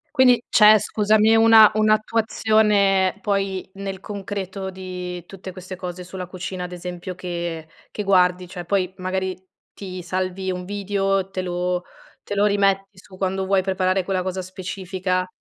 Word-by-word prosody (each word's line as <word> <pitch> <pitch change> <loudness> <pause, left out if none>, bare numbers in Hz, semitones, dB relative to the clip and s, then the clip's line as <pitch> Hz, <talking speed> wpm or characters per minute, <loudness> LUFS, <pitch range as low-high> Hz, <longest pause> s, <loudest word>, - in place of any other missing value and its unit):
Quindi 250 -2 +5
c'è, 215 0 +7
scusami, 215 +2 +3
una 225 -1 +8
un'attuazione 215 -3 +2
poi 195 -3 -1
nel 195 -1 -5
concreto 195 -1 -5
di 180 -2 -6
tutte 190 -1 -9
queste 185 0 -8
cose 180 0 -6
sulla 185 0 -7
cucina, 185 0 -6
ad 180 - -6
esempio, 180 +1 -6
che 170 -3 -5 0.2
che 210 - -4
guardi, 180 -2 +3
cioè 175 -1 -8
poi, 185 0 0
magari, 185 0 -2 0.4
ti 185 -2 -7
salvi 185 +1 -3
un 180 0 -5
video, 195 -1 -1
te 185 -1 -3
lo 180 0 -2 0.4
te - - -5
lo 205 +1 +3
rimetti 195 -1 +1
su 185 0 -15
quando 190 0 -1
vuoi 195 0 +2
preparare 185 0 0
quella 185 0 -1
cosa 185 0 -3
specifica 185 0 -3
190 Hz, 150 wpm, -22 LUFS, 185-200 Hz, 0.4 s, una